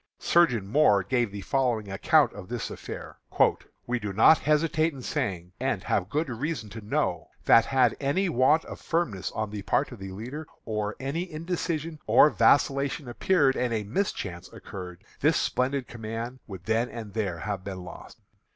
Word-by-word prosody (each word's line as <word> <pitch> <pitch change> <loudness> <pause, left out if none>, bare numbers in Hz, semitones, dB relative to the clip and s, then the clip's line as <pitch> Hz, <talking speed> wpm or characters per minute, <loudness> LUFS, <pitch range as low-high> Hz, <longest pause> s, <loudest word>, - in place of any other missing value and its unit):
Surgeon 160 - +3
Moore 105 -4 +4
gives 120 +2 0
the 100 0 -6
following 115 -2 0
account 140 +6 +3
of 100 -1 -10
this 120 -1 -4
affair: - - -8 0.7
"We 125 0 -1
do 105 -2 -4
not 115 +9 +6
hesitate 155 +1 +2
in 130 -2 -9
saying, 95 - -3
and 130 -7 -1
have 95 -1 0
good 150 +6 0
reason 130 -2 -4
to 110 - -7
know, 105 - -1 0.2
that 115 - +6
had 130 -3 +3
any 145 +8 +1
want 150 +1 +3
of - - -9
firmness 135 - -1
on 110 -1 -3
the 105 -1 -5
part 135 +8 0
of 125 - -10
the 95 0 -7
leader, 125 +11 -7 0.2
or 105 -2 -2
any 165 +7 -3
indecision 165 -1 -3
or 150 - +6
vacillation 140 +4 +2
appeared, 135 +2 +2
and 120 -2 0
a 110 - -1
mischance 100 - -3
occurred, 90 -1 -9 0.2
this 150 +2 +3
splendid 130 0 0
command 115 +2 -6
would 95 -5 -9
then 115 +2 +1
and 110 -4 -8
there 100 -6 -2
have 95 +2 -4
been 95 -2 -6
lost. 90 - -11
120 Hz, 170 wpm, -27 LUFS, 105-150 Hz, 0.7 s, not